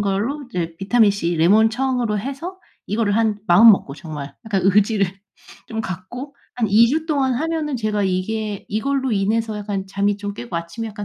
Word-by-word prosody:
걸로 205 +9 -1
이제 170 -7 -3
비타민c 200 -4 +2
레몬 205 +7 +5
청으로 245 -3 0
해서 280 - -6 0.3
이거를 210 0 0
한 220 -2 +1
마음먹고 195 -5 +6
정말 150 -3 -8
약간 195 -3 0
의지를 200 +1 +3 0.6
좀 220 0 -4
갖고 225 - -7 0.2
한 230 -3 0
2 220 +4 +6
주 315 +5 -1
동안 275 -5 +1
하면은 310 0 -2
제가 215 -3 -1
이게 200 +2 -2
이걸로 265 +4 -1
인해서 215 +2 0
약간 200 -2 -4
잠이 200 +1 0
좀 205 0 -5
깨고 120 -2 -8
아침에 170 +7 -5
약간 210 -1 -7
215 Hz, 335 characters per minute, -21 LUFS, 195-240 Hz, 0.6 s, 마음먹고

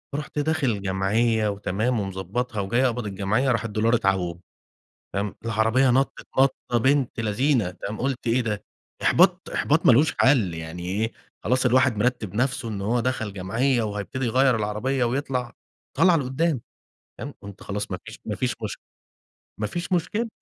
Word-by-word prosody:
رُحت 150 0 -4
داخل 145 -8 0
جمعية 105 +4 +1
وتمام 105 +4 -1
ومضبطها 100 +4 -3
وجاي 120 +7 +1
أقبض 125 -2 -1
الجمعية 105 +6 0
راح 115 -3 0
الدولار 110 +2 +1
اتعوم، 95 -6 0 0.7
فاهم؟ 100 +1 -2
العربية 115 +4 +3
نطت 135 +3 0
نطة 135 0 +5 0.2
بنت 135 0 +1
لذينة 115 0 +1
تمام؟ 100 +4 -6
قلت 135 -1 -2
إيه 120 +2 +3
ده؟! 105 -3 -3 0.4
إحباط، - - +3
إحباط - - +2
ما - - +8
لهوش 145 +7 +4
حل 120 - +4
يعني 80 +2 -7
إيه، 110 +4 -1 0.3
خلاص 125 +3 +2
الواحد 130 -1 +3
مرتب 110 -3 -1
نفسه 125 +1 0
إن 105 -3 -4
هو 115 +5 +1
دخل 115 -4 -2
جمعية 115 +7 0
وهيبتدي 105 +4 -3
يغيّر 130 +1 +3
العربية 110 +5 -1
ويطلع 125 -1 -2 0.4
طلعة 180 -2 +5
لقدام، 140 +1 0 0.6
تمام. 140 +5 -6
قُلت 100 -1 -10
خلاص 100 0 -4
ما 90 - -2
فيش 110 +1 -10
ما 105 - -3
فيش 125 -2 -1
مش 110 -3 -4 0.8
مافيش 170 - -3
مشكلة. 210 +7 0
115 Hz, 155 wpm, -24 LUFS, 105-130 Hz, 0.8 s, ما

